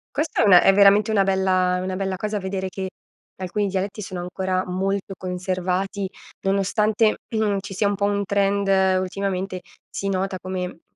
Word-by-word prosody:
Questa 300 Hz, -5 st, +1 dB
è -, -, +4 dB
una 180 Hz, -3 st, +8 dB
è 195 Hz, -, +6 dB
veramente 200 Hz, +2 st, +5 dB
una 200 Hz, -3 st, +3 dB
bella 185 Hz, -1 st, +2 dB
è -, -, -2 dB
una 185 Hz, 0 st, -3 dB
bella 190 Hz, -1 st, -2 dB
cosa 210 Hz, +1 st, -2 dB
vedere 190 Hz, -1 st, -3 dB
che 190 Hz, 0 st, -4 dB, 0.5 s
che -, -, -16 dB
alcuni 200 Hz, +3 st, -1 dB
dialetti 195 Hz, +2 st, -3 dB
sono 185 Hz, -2 st, -6 dB
ancora 185 Hz, +1 st, -2 dB
molto 195 Hz, +1 st, -2 dB
conservati, 185 Hz, +2 st, -2 dB, 0.3 s
nonostante, 210 Hz, +3 st, +2 dB, 0.2 s
mhmm, 210 Hz, -2 st, +1 dB
ci 200 Hz, 0 st, -8 dB
sia 200 Hz, +2 st, +1 dB
un 200 Hz, -, 0 dB
po' 200 Hz, -, 0 dB
un 200 Hz, 0 st, 0 dB
trend, 200 Hz, 0 st, +1 dB, 0.3 s
ultimamente 190 Hz, -1 st, -3 dB, 0.3 s
si 195 Hz, -, -4 dB
nota 190 Hz, 0 st, -1 dB
come 180 Hz, -2 st, -5 dB
195 Hz, 175 wpm, -23 LUFS, 185-200 Hz, 0.5 s, una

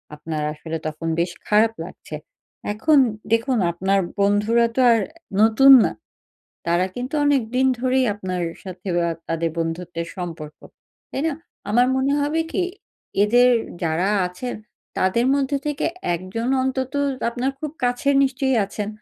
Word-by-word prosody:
আপনার 155 Hz, 0 st, -5 dB
আসলে 160 Hz, +1 st, -5 dB
তখন 155 Hz, +2 st, -5 dB
বেশ 175 Hz, +1 st, 0 dB, 0.2 s
খারাপ 220 Hz, +2 st, +4 dB
লাগছে। 165 Hz, -3 st, -10 dB, 0.6 s
এখন 295 Hz, +8 st, +3 dB, 0.4 s
দেখুন, 235 Hz, +3 st, +2 dB
আপনার 190 Hz, +3 st, +1 dB, 0.2 s
বন্ধুরা 210 Hz, +4 st, +3 dB
তো 260 Hz, -, +2 dB
আর 230 Hz, -, +4 dB, 0.4 s
নতুন 225 Hz, +5 st, +6 dB
না। -, -, 0 dB, 0.8 s
তারা 175 Hz, +2 st, +2 dB
কিন্তু 250 Hz, +4 st, -5 dB
অনেকদিন 260 Hz, -2 st, +2 dB
ধরেই 260 Hz, 0 st, +2 dB
আপনার 185 Hz, -3 st, -4 dB, 0.2 s
সাথে 185 Hz, 0 st, -8 dB
বা 170 Hz, -, +1 dB, 0.2 s
তাদের 165 Hz, 0 st, -1 dB
বন্ধুত্বের 165 Hz, 0 st, -3 dB
সম্পর্ক। 165 Hz, -4 st, -7 dB, 0.5 s
তাই 270 Hz, -, -3 dB
না? 315 Hz, -, -2 dB, 0.4 s
আমার 245 Hz, +4 st, +4 dB
মনে 270 Hz, +2 st, +1 dB
হবে 295 Hz, +3 st, 0 dB
কি, 375 Hz, -, +1 dB, 0.6 s
এদের 245 Hz, +4 st, +5 dB, 0.3 s
যারা 165 Hz, +3 st, 0 dB, 0.2 s
আছেন 180 Hz, +8 st, -6 dB, 0.4 s
তাদের 210 Hz, +6 st, +2 dB
মধ্য 280 Hz, -1 st, -1 dB
থেকে 295 Hz, 0 st, -1 dB, 0.3 s
১ 170 Hz, -, -4 dB, 0.2 s
জন 230 Hz, +2 st, -1 dB
অন্তত 260 Hz, 0 st, -2 dB, 0.4 s
আপনার 250 Hz, +3 st, -1 dB
খুব 305 Hz, -, -3 dB
কাছের 245 Hz, +3 st, +1 dB
নিশ্চয়ই 265 Hz, -1 st, 0 dB
আছেন। 205 Hz, +1 st, -5 dB
220 Hz, 140 wpm, -22 LUFS, 175-260 Hz, 0.8 s, নতুন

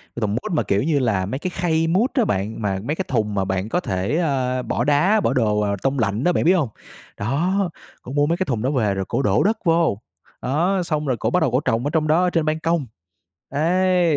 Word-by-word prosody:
cái 120 Hz, -, -5 dB
thùng 105 Hz, -2 st, 0 dB
mút 155 Hz, -, -3 dB
mà, 160 Hz, -, +1 dB
kiểu 100 Hz, +1 st, 0 dB
như 150 Hz, -1 st, +1 dB
là, 105 Hz, -7 st, +1 dB
mấy 130 Hz, +8 st, -4 dB
cái 185 Hz, -, -3 dB
khay 165 Hz, -2 st, 0 dB
mút 205 Hz, -, +2 dB
á 250 Hz, -5 st, +2 dB
bạn, 105 Hz, -, -2 dB
mà 95 Hz, -2 st, -1 dB
mấy 150 Hz, +7 st, -2 dB
cái 190 Hz, -, -3 dB
thùng 110 Hz, -5 st, -1 dB
mà 95 Hz, -1 st, 0 dB
bạn 95 Hz, +2 st, -2 dB
có 175 Hz, -, +1 dB
thể, 95 Hz, -, -1 dB
a, 130 Hz, -6 st, 0 dB
bỏ 120 Hz, -, -1 dB
đá, 150 Hz, -, +3 dB
bỏ 115 Hz, -, +1 dB
đồ, 110 Hz, -5 st, +1 dB
ờ, 100 Hz, -1 st, 0 dB
tông 135 Hz, 0 st, 0 dB
lạnh 110 Hz, +1 st, 0 dB
á 180 Hz, -, +3 dB
bạn -, -, 0 dB
biết 180 Hz, +4 st, +5 dB
hông? 155 Hz, -10 st, +1 dB, 0.5 s
Đó, 175 Hz, -, 0 dB, 0.3 s
cổ 125 Hz, -, -9 dB
mua 145 Hz, +1 st, +2 dB
mấy 170 Hz, +3 st, 0 dB
cái 185 Hz, -, -1 dB
thùng 120 Hz, -5 st, -2 dB
đó 130 Hz, -, 0 dB
về 110 Hz, -8 st, +1 dB
rồi 95 Hz, 0 st, -3 dB
cổ -, -, -1 dB
đổ 105 Hz, -5 st, +2 dB
đất 220 Hz, +3 st, +2 dB
vô, 165 Hz, -, +2 dB, 0.4 s
đó, 175 Hz, +8 st, +1 dB
xong 155 Hz, -3 st, -1 dB
rồi 125 Hz, -, 0 dB
cổ -, -, -1 dB
bắt 180 Hz, -, +2 dB
đầu 160 Hz, -7 st, +1 dB
cổ 125 Hz, -, +2 dB
trồng 115 Hz, -5 st, 0 dB
ở -, -, +1 dB
trong 155 Hz, -1 st, +1 dB
đó 160 Hz, +4 st, +3 dB
ở 180 Hz, -, +3 dB
trên 165 Hz, -3 st, 0 dB
ban 155 Hz, +1 st, 0 dB
công, 165 Hz, -2 st, 0 dB, 0.7 s
ấy. 175 Hz, +2 st, +2 dB
145 Hz, 265 wpm, -21 LUFS, 110-170 Hz, 0.7 s, biết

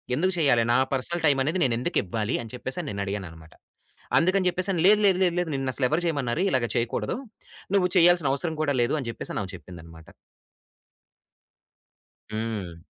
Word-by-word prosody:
ఎందుకు 185 Hz, +6 st, +1 dB
చేయ్యాలి, 135 Hz, -7 st, +3 dB
నా -, -, +4 dB, 0.2 s
పర్సనల్ 165 Hz, +6 st, -1 dB
టైమనేది 150 Hz, +5 st, +2 dB
నేనెందుకివ్వాలి, 115 Hz, -2 st, -1 dB
అని 115 Hz, -, -10 dB
చెప్పేసని 145 Hz, +6 st, -5 dB
నేను 100 Hz, 0 st, -3 dB
అడిగానన్నమాట. 85 Hz, -5 st, -7 dB, 0.6 s
అందుకని 185 Hz, +2 st, +3 dB
చెప్పేసి, 185 Hz, +2 st, -1 dB
"లేదు, 210 Hz, +1 st, +6 dB
లేదు, 190 Hz, -2 st, +4 dB
లేదు, 175 Hz, -1 st, +1 dB
లేదు 175 Hz, -2 st, -2 dB
నిన్ను 135 Hz, -1 st, -2 dB
అసలెవరు 140 Hz, +6 st, 0 dB
చేయమన్నారు, 140 Hz, -2 st, -1 dB
ఇలాగ 125 Hz, -3 st, +1 dB
చేయకూడదు. 115 Hz, 0 st, -1 dB, 0.6 s
నువ్వు 185 Hz, -2 st, +3 dB
చేయాల్సిన 170 Hz, -5 st, +5 dB
అవసరం 160 Hz, +3 st, -2 dB
కూడా 145 Hz, -2 st, +1 dB
లేదు," 120 Hz, +5 st, +1 dB
అని 125 Hz, -, -6 dB
జెప్పేసి -, -, -6 dB
అని -, -, -2 dB
ఆమె 95 Hz, -, -8 dB
చెప్పిందన్నమాట. 80 Hz, -3 st, -13 dB, 2.2 s
హ్మ్. 105 Hz, -7 st, -4 dB
135 Hz, 150 wpm, -25 LUFS, 110-170 Hz, 2.2 s, లేదు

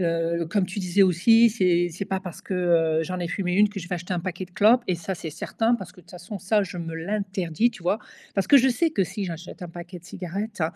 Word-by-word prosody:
Heu, 170 Hz, -1 st, 0 dB
comme 190 Hz, +2 st, +1 dB
tu 185 Hz, +3 st, -6 dB
disais 185 Hz, +1 st, +3 dB
aussi: 225 Hz, +6 st, +5 dB
«C'est 180 Hz, -5 st, +2 dB
c'est 180 Hz, +4 st, -5 dB
pas 190 Hz, 0 st, -2 dB
parce 180 Hz, -4 st, -8 dB
que, 190 Hz, -, -5 dB
heu, 165 Hz, -3 st, +2 dB
j'en 185 Hz, +3 st, -4 dB
ai 175 Hz, -, -1 dB
fumé 180 Hz, -1 st, -2 dB
1 210 Hz, +2 st, +5 dB
que 205 Hz, -1 st, -7 dB
je 170 Hz, -, -8 dB
vais 180 Hz, -, -1 dB
acheter 180 Hz, +2 st, -4 dB
un 175 Hz, -, -1 dB
paquet 185 Hz, +1 st, -4 dB
de -, -, -27 dB
clopes» 225 Hz, +6 st, +5 dB
et 180 Hz, -, +2 dB
ça 175 Hz, +3 st, -4 dB
c'est 165 Hz, -, -7 dB
certain, 225 Hz, +9 st, 0 dB
parce 190 Hz, -6 st, -6 dB
que -, -, -16 dB
de -, -, -23 dB
toute -, -, -16 dB
façon 180 Hz, +3 st, -8 dB
ça 205 Hz, +3 st, +2 dB
je 180 Hz, -1 st, -6 dB
me 165 Hz, -1 st, -5 dB
l'interdis, 190 Hz, +2 st, -1 dB
tu 215 Hz, -, -13 dB
vois? 180 Hz, +5 st, +1 dB, 0.4 s
Parce 195 Hz, -2 st, 0 dB
que 280 Hz, -, +7 dB
je 265 Hz, 0 st, +5 dB
sais 325 Hz, +7 st, +2 dB
que 200 Hz, -, +1 dB
si 200 Hz, +3 st, -5 dB
j'achète 170 Hz, +1 st, -8 dB
un 180 Hz, -, -6 dB
paquet 175 Hz, +1 st, -9 dB
de 170 Hz, -, -22 dB
cigarettes, 190 Hz, +3 st, -5 dB
185 Hz, 275 wpm, -25 LUFS, 170-205 Hz, 0.4 s, que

